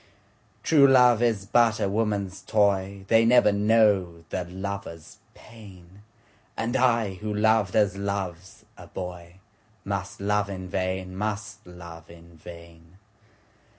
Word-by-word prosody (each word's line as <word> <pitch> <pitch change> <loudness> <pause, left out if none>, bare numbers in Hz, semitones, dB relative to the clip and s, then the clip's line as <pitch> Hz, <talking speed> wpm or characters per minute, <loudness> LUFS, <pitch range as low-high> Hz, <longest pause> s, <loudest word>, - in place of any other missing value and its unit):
True 145 -4 +5
love 125 -3 +5
is 110 -5 0
but 115 0 +2
a - - 0
woman's 100 -2 -2
toy, 100 -2 0
They 115 +2 +4
never 115 -2 +5
know 100 -5 +2
the 90 - -3
lover's 95 -1 -8 0.2
pain, 100 -4 -16 0.6
And 120 +3 -2
I 115 -6 +2
who 105 +3 -6
loved 105 -2 +1
as 105 -3 +2
loves 95 -3 -5
a - - -13
boyMust 95 +3 -8
love 105 0 0
in 95 -1 -7
vain, 95 0 -3
must 105 -1 -5
love 85 -2 -12
in 85 0 -16
vain. 85 +1 -14
100 Hz, 120 wpm, -25 LUFS, 90-110 Hz, 0.6 s, True